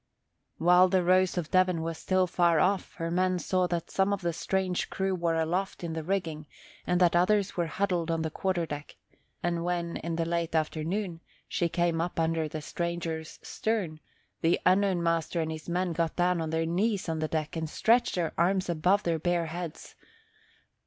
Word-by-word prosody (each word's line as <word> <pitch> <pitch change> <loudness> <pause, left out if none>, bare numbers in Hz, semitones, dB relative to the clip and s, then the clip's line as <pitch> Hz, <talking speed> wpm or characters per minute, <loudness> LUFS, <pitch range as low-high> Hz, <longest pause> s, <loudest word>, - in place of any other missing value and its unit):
While 180 +2 +6
the 185 0 +2
Rose 185 +1 +3
of 170 -3 -3
Devon 185 -3 +3
was 165 0 -3
still 185 -1 +2
far 170 -2 +3
off, 190 +3 +1
her 165 -1 -3
men 185 +1 +2
saw 185 0 +1
that 170 -1 -3
some 195 +1 +2
of 200 -1 -1
the 170 -1 -1
strange 185 +1 -1
crew 190 0 -1
were 170 -2 0
aloft 175 +4 -1
in 165 -1 -3
the 160 - -3
rigging 160 -4 -2 0.4
and 180 0 +2
that 175 -2 +4
others 200 +3 +2
were 175 -2 0
huddled 175 -1 -1
on 165 -1 0
the 160 - -2
quarter 185 -1 -1
deck; 145 -2 -7 0.5
and 170 -1 0
when, 170 -1 -2
in 170 0 -4
the 165 0 0
late 170 -1 -1
afternoon, 165 +3 -1 0.3
she 170 - 0
came 170 -1 +1
up 175 0 -3
under 160 -1 +1
the 155 0 -6
stranger's 170 -1 -4
stern, 200 -9 -2 0.4
the 165 +1 +3
unknown 185 -1 +3
master 165 0 0
and 160 -1 -1
his 160 +2 -7
men 180 0 0
got 165 0 -1
down 175 -1 +2
on 160 - -2
their 160 +1 0
knees 195 +4 0
on 160 -1 -2
the 155 - 0
deck 155 0 -3
and 160 -1 -3
stretched 235 +8 +2
their 175 -3 -1
arms 185 +2 +2
above 180 +5 +2
their 165 -2 0
bare 175 +1 +1
heads. 165 0 -6
170 Hz, 195 wpm, -29 LUFS, 165-185 Hz, 0.5 s, While